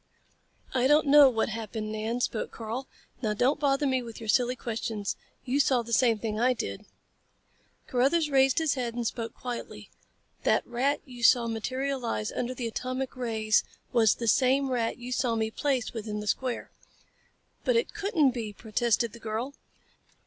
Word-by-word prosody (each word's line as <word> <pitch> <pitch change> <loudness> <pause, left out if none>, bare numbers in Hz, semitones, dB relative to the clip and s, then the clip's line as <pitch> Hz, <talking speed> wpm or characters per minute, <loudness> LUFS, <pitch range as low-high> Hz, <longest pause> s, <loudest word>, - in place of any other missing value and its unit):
"I 255 -1 +3
don't 300 +2 +5
know 285 -1 +8
what 225 -3 0
happened, 220 -1 -4
Nan," 220 +3 -2
spoke 225 - -1
Karl. 230 +4 -5 0.3
"Now 215 -3 0
don't 260 +7 +2
bother 280 0 +2
me 260 -2 +1
with 230 -2 -9
your 225 -2 -7
silly 250 +2 +3
questions. 225 -4 -3 0.3
You 265 +2 0
saw 260 -4 +3
the 230 0 -6
same 230 -2 +4
thing 215 0 -3
I 250 +2 +4
did." 100 - -5 1.0
Carruthers 285 +5 +2
raised 270 -1 +4
his 320 -2 +2
head 240 -3 -3
and 240 -1 -2
spoke 230 0 -3
quietly. 245 -2 -7 0.5
"That - - +2
rat 260 +4 0
you 245 -2 -11
saw 235 +1 +5
materialize 240 - -2
under 250 +1 -3
the 245 - -4
atomic 255 +3 -3
rays 220 -3 +1 0.3
was 225 -4 +5
the 230 - -4
same 265 +3 +3
rat 235 -2 0
you 245 +1 -8
saw 240 -1 +1
me 220 0 -1
place 265 -2 -1
within 215 -2 -4
the 210 - -5
square." 250 +3 -2 0.9
"But - - +2
it 465 - +1
couldn't 390 -10 +2
be," 225 -4 -5
protested 230 +1 0
the 235 - -11
girl. 225 +5 -3
245 Hz, 170 wpm, -28 LUFS, 225-265 Hz, 1.0 s, know